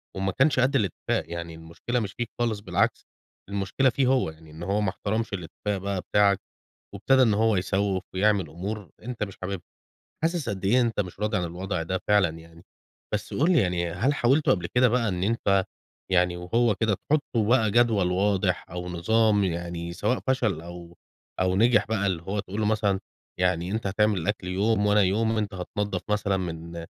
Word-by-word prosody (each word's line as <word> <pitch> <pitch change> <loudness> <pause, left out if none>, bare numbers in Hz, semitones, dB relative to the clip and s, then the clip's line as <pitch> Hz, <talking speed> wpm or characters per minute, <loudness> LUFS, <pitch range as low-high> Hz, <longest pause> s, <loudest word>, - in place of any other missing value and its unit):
وما 95 0 -1
كانش 135 +5 +2
قد 130 +3 +2
الاتفاق، 100 -6 -1
يعني 85 -1 -5
المشكلة 85 +10 -4
مش 100 -4 -4
فيك 120 -1 -4
خالص 115 -3 0
بالعكس، 100 - 0 0.4
المشكلة 100 +7 +1
فيه 130 +1 +1
هو، 130 -9 +2
يعني 80 0 -14
إن 80 +3 -9
هو 100 +3 0
ما 105 - +1
احترمش 110 +4 -3
الاتفاق 100 +3 -3
بقى 95 0 -3
بتاعك، 100 -1 +3 0.6
وابتدى 135 -1 +3
إن 110 -4 +4
هو 110 0 +3
يسوِّف 95 0 0
ويعمل 100 -4 +2
أمور 95 +1 -6
أنت 120 0 -6
مش 100 -2 -4
حاببها، 95 -2 -4 0.6
حاسس 165 -6 0
قد 95 -1 -4
إيه 125 +6 +4
أنت 115 -3 0
مش 90 -3 -3
راضي 105 0 0
عن 90 - -1
الوضع 90 0 -3
ده 95 +2 -2
فعلًا 105 -4 +4
يعني. 85 +1 -16 0.5
بس - - -3
قل 160 +7 +2
لي 170 - +4
يعني 90 -4 0
هل 115 +12 +1
حاولتوا 140 +2 +3
قبل 90 - -3
كده 125 +1 +3
بقى 120 -1 +1
إن 90 -1 -2
أنت 100 -3 +2 0.5
يعني 90 -1 +3
وهو 110 +5 +1
كده 110 0 +1
تحطوا 120 -5 0
بقى 115 -4 +4
جدول 110 -6 +3
واضح 95 -1 +1
أو 90 +1 -5
نظام 105 +4 +2
يعني 85 -1 -3
سواء 125 +8 0
فشل 115 -11 +1
أو 85 0 -10 0.4
أو 95 0 +2
نجح 115 +5 +4
بقى 110 -3 0
اللي 90 -4 -1
هو 100 +4 -3
تقول 100 +1 -5
له 110 - +1
مثلًا 105 -2 +1 0.4
يعني 90 0 +1
أنت 110 -1 -2
هتعمل 105 +1 +2
الأكل 90 +1 -2
يوم 105 +3 +1
وأنا 105 0 +4
يوم 105 +4 +2
وأنت 105 -2 -2
هتنضف 100 +3 -3
مثلًا 100 -2 +1
من 85 -1 -5
100 Hz, 185 wpm, -26 LUFS, 90-110 Hz, 0.6 s, إن